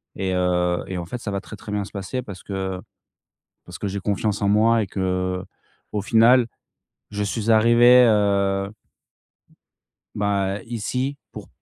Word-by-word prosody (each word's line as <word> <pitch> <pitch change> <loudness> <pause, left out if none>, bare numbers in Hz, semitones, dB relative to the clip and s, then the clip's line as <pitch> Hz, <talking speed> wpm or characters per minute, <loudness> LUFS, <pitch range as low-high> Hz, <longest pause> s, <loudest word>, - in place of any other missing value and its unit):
et 95 -1 -2
heu, 90 -1 +1
et 95 - -4
en 85 - -4
fait 120 +8 -6
ça 105 - -5
va 100 - -2
très 110 - -10
très 105 - -10
bien 105 -1 -1
se - - -13
passer 100 +6 -4
parce 100 -7 -10
que, 95 -2 -4 0.8
parce - - -10
que 100 - -3
j'ai 100 +1 -4
confiance 100 +1 -1
en 100 - +2
moi 110 +2 +4
et 100 - -3
que, 90 -1 -2 0.5
au 105 - -1
final, 115 +3 +5 0.6
je 105 0 -3
suis 110 +2 -2
arrivé, 120 +3 +6
heu 100 -2 +1 1.5
bah 100 -1 -1
ici, 125 +5 -3
pour, - - -10
100 Hz, 160 wpm, -22 LUFS, 95-115 Hz, 1.5 s, arrivé